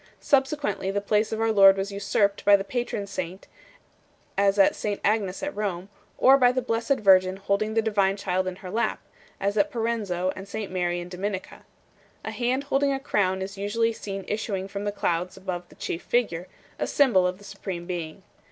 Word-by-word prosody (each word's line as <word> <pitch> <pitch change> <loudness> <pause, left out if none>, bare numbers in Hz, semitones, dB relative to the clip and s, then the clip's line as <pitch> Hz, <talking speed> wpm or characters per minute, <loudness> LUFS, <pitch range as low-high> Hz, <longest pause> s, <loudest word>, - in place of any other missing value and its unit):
Subsequently 270 -8 +1
the 200 +1 0
place 210 +1 +1
of 220 - -2
our 225 0 +2
Lord 195 -2 +7
was 195 +1 -2
usurped 200 0 0
by 205 0 +7
the 195 - 0
patron 240 -2 -3
saint 185 -1 -6 0.9
(as 200 0 +3
at 195 - +5
St 205 -1 -3
Agnes 205 0 0
at 290 0 -3
Rome), 195 -3 -3 0.3
or 270 +2 +6
by 245 -1 +6
the 255 - 0
Blessed 230 +3 0
Virgin 185 -2 +5
holding 200 +2 -1
the 225 - +3
Divine 200 -3 +1
Child 185 -1 -1
in 185 - -3
her 180 - -5
lap 230 +3 0 0.4
(as 200 +2 -1
at 200 - +3
Parenzo 210 -6 -1
and 195 +1 -8
St 210 -1 -5
Mary 175 -1 -1
in 175 - -6
Dominica). 190 +2 -5 0.6
A - - -3
hand 255 +3 -1
holding 280 0 +1
a 270 - -1
crown 190 -8 0
is 195 +1 -7
usually 225 +3 0
seen 195 -3 -6
issuing 205 -3 -2
from 200 +1 -5
the 205 - 0
clouds 180 -2 -2
above 180 -2 -5
the - - -17
chief 165 - -4
figure, 185 -8 0 0.3
a - - -1
symbol 230 -11 +4
of 180 0 -3
the 205 - -17
Supreme 195 -3 -6
Being. 175 0 -5
200 Hz, 195 wpm, -26 LUFS, 185-220 Hz, 0.9 s, Lord